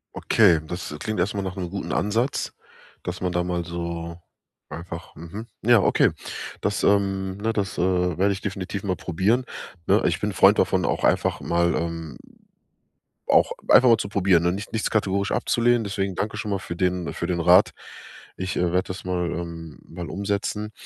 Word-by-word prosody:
Okay, 95 -8 +4
das 85 -2 -6
klingt 110 +2 -3
erstmal 100 +2 0
nach 95 -1 -4
'nem 90 -3 -4
guten 100 +2 -5
Ansatz, 115 +7 0 0.5
dass 90 +1 -5
man 90 -1 0
da 90 0 0
mal 90 -1 -2
so 85 0 -5 0.5
einfach 85 +1 -8
mhm, 85 +9 -8
ja, 120 +1 +5
okay. - - +4 0.5
Das, 105 0 -1
ähm 95 -1 +1
ne, 110 +2 -1
das, 100 -3 -2
äh, 90 -1 +1
werde 100 +2 +3
ich 95 - -7
definitiv 100 0 -4
mal 95 -3 -1
probieren, 95 +10 0 0.4
ne? - - +4
Ich - - 0
bin - - -1
'n - - -9
Freund - - +6
davon, - - +2
auch - - -1
einfach - - +2
mal, 85 0 +1
ähm 80 -5 -4 1.1
auch - - +4 0.2
einfach 125 - +7
mal 115 - +7
zu 100 - -3
probieren, 95 -4 +3
ne, 85 0 +2
nicht 100 +2 -6
nichts 110 - 0
kategorisch 100 -2 0
abzulehnen. 120 0 +2
Deswegen 100 -1 -2
danke 105 +3 -3
schon 105 -1 -4
mal 100 - 0
für 85 -2 -7
den 90 -1 -1
für 85 - -3
den 85 -1 -1
Rat. 90 +4 +6 0.7
Ich 95 0 -4
werde 90 +1 +2
das 95 0 -7
mal, 90 -2 -1
ähm 85 -3 -6
mal 85 0 -7
umsetzen. 100 +3 -2
95 Hz, 180 wpm, -24 LUFS, 85-100 Hz, 1.1 s, einfach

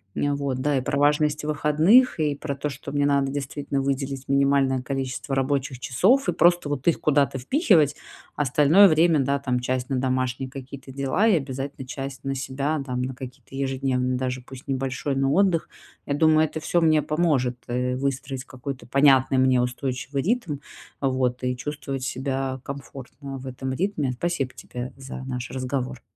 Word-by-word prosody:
Нь 145 - 0
вот, 140 -2 -1
да, 145 0 +1
и 130 - 0
про 140 +2 -1
важность 150 +1 +2
выходных, 155 - +4
и 150 -2 +1
про 140 -1 -4
то, 150 +2 -3
что 140 0 -8
мне 145 0 +1
надо 140 -1 +2
действительно 140 0 -3
выделить 135 0 -2
минимальное 140 -2 +2
количество 135 0 -3
рабочих 135 -1 0
часов 210 - +3
и - - +1
просто 175 -3 +3
вот 145 +1 -3
их 170 - +3
куда-то 140 -2 +2
впихивать, 160 - +3 0.4
остальное 150 +7 +5
время, 160 -2 +4
да, 140 +2 0
там, 125 -3 -1
часть 125 0 -2
на 135 - 0
домашние 130 0 -1
какие-то 135 0 -9
дела 140 +10 +1
и 210 - +5
обязательно 135 -1 -5
часть 135 0 -6
на 135 0 -2
себя, 135 +3 -2
там, 125 -1 -2
на 130 0 -3
какие-то 130 +1 -10
ежедневные 130 -1 0
даже 130 0 -2
пусть 130 +1 -12
небольшой, 135 +1 -2
но 135 +1 +1
отдых. 185 -3 +2 0.4
Я - - -1
думаю, 155 +1 +4
это 160 +1 -5
всё 175 +2 +1
мне 155 -1 +4
поможет, 145 -6 +1
э, 125 +1 -1
выстроить 135 -1 -3
какой-то 130 0 -7
понятный 135 0 +4
мне 130 -1 +4
устойчивый 130 +2 -3
ритм, 180 - -1 0.4
вот, 130 -2 0
и 125 0 -1
чувствовать 140 -1 -5
себя 135 0 -2
комфортно 135 0 -8
в 130 - -9
этом 130 +1 -4
ритме. 160 -5 -1
Спасибо 135 -1 -2
тебе 125 0 -7
за 135 -1 -8
наш 125 -2 -4
разговор. 130 -1 -3
135 Hz, 170 wpm, -24 LUFS, 130-145 Hz, 0.4 s, остальное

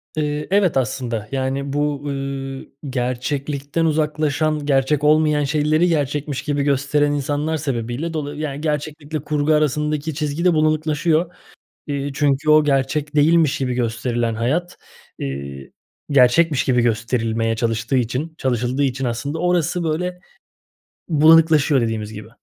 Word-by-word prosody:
Eee, 150 -1 -2
evet, 195 -6 +3
aslında, 120 -3 -2
yani, 135 +1 -2
bu, 145 -1 -1
ııı, 135 -1 -4 0.2
gerçeklikten 135 +5 -2
uzaklaşan, 155 -1 0
gerçek 140 +1 +1
olmayan 150 0 +3
şeyleri 155 +3 +2
gerçekmiş 145 -3 -1
gibi 145 -1 -1
gösteren 145 +1 +1
insanlar 145 +2 -1
sebebiyle 135 +2 -3
dolayı 145 -1 -4
yani, 145 -2 -4
gerçeklikle 150 0 -3
kurgu 150 +1 0
arasındaki 150 +1 0
çizgi 150 +3 -2
de 180 - +5
bulanıklaşıyor. 155 +2 +1 0.5
İii, 140 -1 -3
çünkü 145 +1 +1
o 155 0 +6
gerçek 145 +2 0
değilmiş 155 0 +3
gibi 125 -2 -1
gösterilen 120 -1 -1
hayat, 150 +11 -1 0.4
iii, 70 0 -6 0.4
gerçekmiş 140 +2 +4
gibi 125 -2 +2
gösterilmeye 115 -1 0
çalıştığı 115 +2 -1
için 130 +6 -2
çalışıldığı 125 +1 0
için 135 0 -1
aslında 130 +6 -3
orası 180 -1 0
böyle 180 +3 -2 0.9
bulanıklaşıyor 155 -2 +5
dediğimiz 110 -2 -2
gibi. 105 0 -9
145 Hz, 125 wpm, -20 LUFS, 130-155 Hz, 0.9 s, o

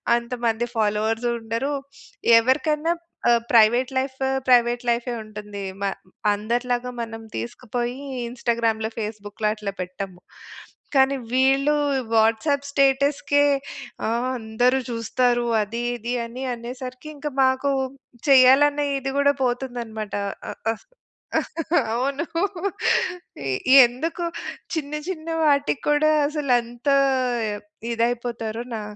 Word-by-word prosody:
అంత 235 +1 -3
మంది 225 +1 +1
ఫాలోవర్స్ 220 +2 +1
ఉండరు. 230 +6 -2 0.7
ఎవరికైనా 300 +6 +1 0.4
ఆహ్, 235 -1 +4
ప్రైవేట్ 240 +4 +5
లైఫు 265 0 -3 0.2
ప్రైవేట్ 240 0 +4
లైఫే 240 +1 -1
ఉంటుంది. 210 -1 -8 0.2
మ - - 0 0.5
అందరిలాగా 245 +3 -1
మనం 225 0 -8
తీసుకుపోయి 240 +1 -4 0.3
ఇన్‌స్టాగ్రామ్‌లో 230 -2 -1
ఫేస్‌బుక్‌లో 210 0 -4
అట్లా 210 -2 -5
పెట్టము. 185 0 -6 0.7
కానీ 270 +1 +5 0.2
వీళ్ళు 270 +3 +3 0.4
వాట్సాప్ 225 +6 +2
స్టేటస్‌కే 280 +1 +2 0.7
"ఆ - - +1 0.3
అందరూ 240 +3 +1
చూస్తారు 240 +1 +1 0.2
అది 230 +3 -3
ఇది" 240 +1 -4
అని 245 +3 -7
అనేసరికి 250 +3 -7
ఇంక 290 +1 -5 0.2
మాకు 260 +2 +2 0.6
చేయాలనే 275 +3 +6
ఇది 270 0 -3
కూడా 285 0 +4
పోతుందన్నమాట 240 -4 -3 0.4
అ! - - -6 0.2
ఆహ్, 225 - -9 1.1
అవును. 275 +6 -1 1.5
ఈ - - +8
ఎందుకు 320 +8 -4 0.5
చిన్న 295 -3 -3 0.2
చిన్న 330 -3 -5
వాటికి 285 -1 +2
కూడా 295 +1 +4 0.2
అసలంత 250 -4 0 1.0
ఇదైపోతారో 235 -1 -2
నా 220 - -4
245 Hz, 100 wpm, -23 LUFS, 225-270 Hz, 1.5 s, ఈ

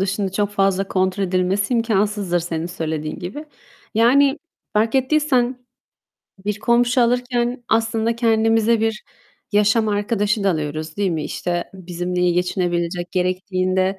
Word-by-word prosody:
dışında 195 0 -1
çok 205 0 0
fazla 195 -1 +1
kontrol 190 +1 0
edilmesi 190 +5 0
imkânsızdır 205 -5 +1
senin 165 -1 -3
söylediğin 160 -3 -4
gibi. 200 - -6 0.5
Yani 270 +6 +4 0.3
fark 220 +3 +1
ettiysen 265 -2 +2 0.9
bir 210 0 -2
komşu 240 +2 +2
alırken 245 0 0
aslında 225 0 +1
kendimize 225 -1 +3
bir 225 0 -1 0.5
yaşam 210 +2 +3
arkadaşı 205 0 0
da 195 - +4
alıyoruz, 155 -1 -4
değil 200 -3 +1
mi? 155 -3 -2
İşte, 175 -1 -2
bizimle 180 0 -4
iyi 180 -1 +3
geçinebilecek, 175 0 -1
gerektiğinde, 185 +1 0
200 Hz, 125 wpm, -21 LUFS, 180-230 Hz, 0.9 s, Yani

